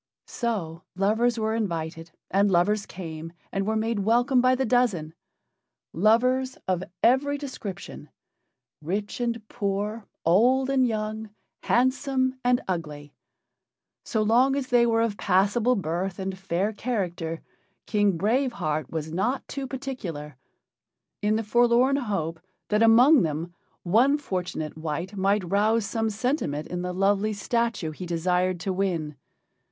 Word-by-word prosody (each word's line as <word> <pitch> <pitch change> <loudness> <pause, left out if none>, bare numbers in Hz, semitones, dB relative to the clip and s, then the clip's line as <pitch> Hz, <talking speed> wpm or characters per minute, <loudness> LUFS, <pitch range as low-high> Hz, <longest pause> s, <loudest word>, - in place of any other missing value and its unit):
So 185 -9 -3
lovers 220 +5 +2
were 220 0 0
invited, 165 -6 -3 0.2
and 200 +1 +3
lovers 200 +3 +2
came 165 -2 -7 0.2
and 195 0 -2
were 220 - +1
made 220 0 0
welcome 240 +5 +3
by 255 +1 +4
the 265 +1 0
dozen. 215 -11 +1 0.8
Lovers 250 +7 +2
of 185 -1 0 0.2
every 285 +4 +3
description 260 -9 -7 0.7
rich 200 +9 -3
and 230 -2 -2
poor, 210 0 -3 0.2
old 250 +10 +4
and 260 -2 +3
young, 215 -1 -3 0.3
handsome 260 +1 +1
and 245 +1 +3
ugly 150 -5 -4 0.9
so 220 -2 0
long 250 +5 +4
as 270 -2 -3
they 240 -1 +4
were 225 0 +2
of 215 -3 -2
passable 205 +8 +2
birth 180 0 -2
and 190 0 -3
fair 190 +2 -1
character, 180 -8 -3 0.4
King 205 -4 +2
Brave 240 +8 +1
Heart 155 - -2
was 160 -1 -4
not 235 +10 -1
too 275 -1 -5
particular 200 - -6 0.9
in 210 +1 +2
the 225 - 0
forlorn 240 +4 +3
hope 190 - -2 0.3
that 210 +1 +2
among 245 +6 +7
them 160 +1 -2 0.3
one 240 +11 +4
fortunate 180 - -4
wight 165 +5 -4
might 195 -1 +1
rouse 215 +2 +2
some 225 +1 -1
sentiment 215 - -2
in 180 0 -3
the 180 0 -3
lovely 200 +3 +1
statue 230 -5 -1
he 180 +4 -7
desired 180 +1 0
to 190 - -1
win. 170 -6 -1
210 Hz, 135 wpm, -26 LUFS, 180-240 Hz, 0.9 s, among